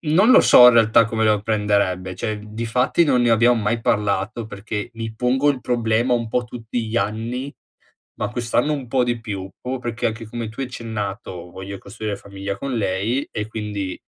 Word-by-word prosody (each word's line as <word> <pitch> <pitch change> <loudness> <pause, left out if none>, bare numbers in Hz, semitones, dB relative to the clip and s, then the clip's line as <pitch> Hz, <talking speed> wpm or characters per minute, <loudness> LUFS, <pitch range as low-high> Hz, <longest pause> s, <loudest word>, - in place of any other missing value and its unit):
non 180 +10 +4
lo 260 - +8
so 125 0 +8
in 120 - +5
realtà 115 0 +5
come 110 -1 -1
lo 105 -2 +2
prenderebbe, 100 -4 0
cioè 105 +3 -3
difatti 115 +8 0
non 130 -5 +3
ne 120 - +3
abbiam 120 +1 +4
mai 110 +2 0
parlato, 105 +1 0
perché 105 +1 -5
mi 115 -1 -5
pongo 125 +5 +1
il 135 -3 -3
problema 120 0 +1
un 115 -1 -2
po' 120 +2 0
tutti 115 -1 -5
gli 110 - -3
anni 120 +6 -2 0.7
ma 105 - -2
quest'anno 120 +5 0
un 140 -4 -4
po' 130 +1 +2
di 120 -1 -2
più 100 -4 -6
proprio, 130 +1 -3
perché 120 -1 -2
anche 110 +1 -4
come 115 0 -5
tu 115 - -9
hai 135 - -1
accennato, 105 -7 -6
voglio 95 +2 -7
costruire 105 +1 -5
famiglia 100 0 -6
con 135 +3 -3
lei, 105 +6 -1
e 105 -1 -3
quindi 105 -4 -4
115 Hz, 190 wpm, -21 LUFS, 105-120 Hz, 0.7 s, lo